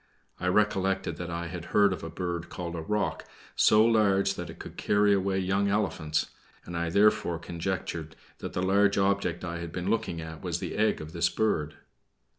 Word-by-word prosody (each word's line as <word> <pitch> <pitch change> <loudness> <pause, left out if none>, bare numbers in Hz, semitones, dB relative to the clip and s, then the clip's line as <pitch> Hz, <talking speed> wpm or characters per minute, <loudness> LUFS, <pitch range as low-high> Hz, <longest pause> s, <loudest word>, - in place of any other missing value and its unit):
I 90 - -2
recollected 95 -3 +1
that 85 0 -5
I 85 0 -3
had 85 0 -6
heard 100 -2 +4
of 95 - -7
a 80 - -4
bird 85 +1 -4
called 85 -1 -5
the 85 - -4
roc, 105 +6 -1 0.3
so 110 +1 +5
large 100 -4 +3
that 90 -2 -6
it - - -9
could - - -9
carry 105 0 +3
away 95 0 +1
young 95 +2 +1
elephants, 85 -7 0 0.3
and 85 - -7
I 85 0 -1
therefore 100 -2 +3
conjectured 85 -1 -4 0.2
that - - -6
the 90 - -1
large 100 +1 +3
object 95 -3 +1
I 85 -1 -4
had 85 -1 -6
been 90 +3 -2
looking 100 -7 -1
at 80 -1 -8
was - - -2
the - - -5
egg 110 -4 +1
of 80 +1 -8
this 85 - +2
bird. 80 -9 0
90 Hz, 195 wpm, -28 LUFS, 85-100 Hz, 0.3 s, so